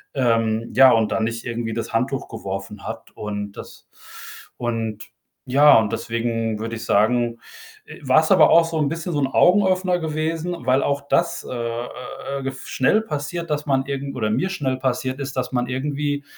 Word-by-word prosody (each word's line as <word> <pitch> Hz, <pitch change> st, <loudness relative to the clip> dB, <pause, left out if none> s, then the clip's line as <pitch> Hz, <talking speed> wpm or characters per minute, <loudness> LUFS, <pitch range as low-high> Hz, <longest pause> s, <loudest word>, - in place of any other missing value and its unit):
ähm, 115 Hz, -3 st, +1 dB
ja, 130 Hz, -1 st, +8 dB
und 115 Hz, -2 st, +2 dB
dann 110 Hz, -, 0 dB
nicht 115 Hz, 0 st, -4 dB
irgendwie 115 Hz, -1 st, -3 dB
das 115 Hz, -, -4 dB
Handtuch 130 Hz, +3 st, -1 dB
geworfen 100 Hz, -1 st, -6 dB
hat -, -, -7 dB
und 105 Hz, -1 st, -5 dB
das -, -, -12 dB, 0.7 s
und, 115 Hz, -3 st, -3 dB, 0.4 s
ja 145 Hz, +2 st, +7 dB
und 110 Hz, -1 st, -1 dB
deswegen 115 Hz, -1 st, -2 dB
würde 115 Hz, +1 st, -4 dB
ich 115 Hz, +1 st, -7 dB
sagen, 115 Hz, +2 st, +2 dB, 0.5 s
äh, -, -, -12 dB
war's 155 Hz, +6 st, +3 dB
aber 185 Hz, -5 st, +7 dB
auch 170 Hz, 0 st, +7 dB
so 165 Hz, -1 st, -3 dB
'n 145 Hz, -, +2 dB
bisschen 165 Hz, +2 st, -4 dB
so 145 Hz, -, 0 dB
'n 135 Hz, -, +2 dB
Augenöffner 185 Hz, +2 st, +3 dB
gewesen, 160 Hz, +2 st, -2 dB
weil 130 Hz, +1 st, +3 dB
auch 140 Hz, 0 st, 0 dB
das, 170 Hz, 0 st, +1 dB
äh, -, -, -4 dB
äh, 120 Hz, +3 st, -5 dB
äh, -, -, -7 dB
gef 135 Hz, 0 st, -5 dB
schnell 205 Hz, +12 st, +2 dB
passiert, 165 Hz, -1 st, -4 dB
dass 150 Hz, 0 st, -1 dB
man 135 Hz, -1 st, +1 dB
irgend 140 Hz, 0 st, -4 dB
oder 110 Hz, -4 st, -1 dB
mir 185 Hz, +11 st, 0 dB
schnell 135 Hz, -8 st, -2 dB
passiert 130 Hz, +1 st, -2 dB
ist, 135 Hz, -1 st, -5 dB
dass 125 Hz, 0 st, -2 dB
man 125 Hz, -1 st, 0 dB
irgendwie 145 Hz, +2 st, -2 dB
130 Hz, 185 wpm, -22 LUFS, 115-150 Hz, 0.7 s, ja